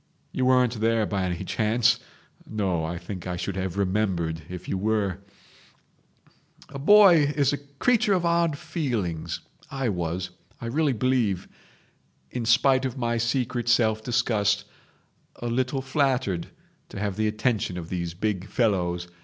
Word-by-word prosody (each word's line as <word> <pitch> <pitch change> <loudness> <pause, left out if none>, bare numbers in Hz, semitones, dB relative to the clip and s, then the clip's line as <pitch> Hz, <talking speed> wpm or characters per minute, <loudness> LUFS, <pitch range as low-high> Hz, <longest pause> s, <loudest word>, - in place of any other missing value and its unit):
You 130 -1 0
weren't 125 -3 +3
there 115 -1 +2
by 100 -2 -1
any 90 0 -3
chance? 110 +3 +2 0.5
No, 95 -6 -1
I 85 +2 -3
think 90 +1 -7
I 90 - -2
should 90 +2 -4
have 95 -1 -3
remembered 90 -5 0
if 90 -1 -7
you - - -1
were..... 100 -1 0 1.5
"A 140 -1 -7
boy 170 -3 +7
is 140 -1 +2
a 145 - -2 0.2
creature 220 - +3
of 180 -2 +1
odd 170 -3 +2
feelings. 110 - -3 0.3
I 135 -4 -1
was, 90 -1 -3 0.3
I - - -7
really 145 +4 +1
believe, 115 -6 0 0.8
in 120 -2 -3
spite 130 +3 +4
of 130 0 -3
my 120 -2 0
secret 120 0 -1
self 110 -2 +3
disgust, 105 -4 +1 0.7
a - - -8
little 130 +3 -1
flattered 130 - 0 0.4
to - - -7
have 100 -2 -2
the 110 +1 0
attention 105 -3 -1
of 85 -1 -6
these 85 -2 -3
big 100 0 -2
fellows. 90 -7 0
110 Hz, 145 wpm, -26 LUFS, 95-130 Hz, 1.5 s, boy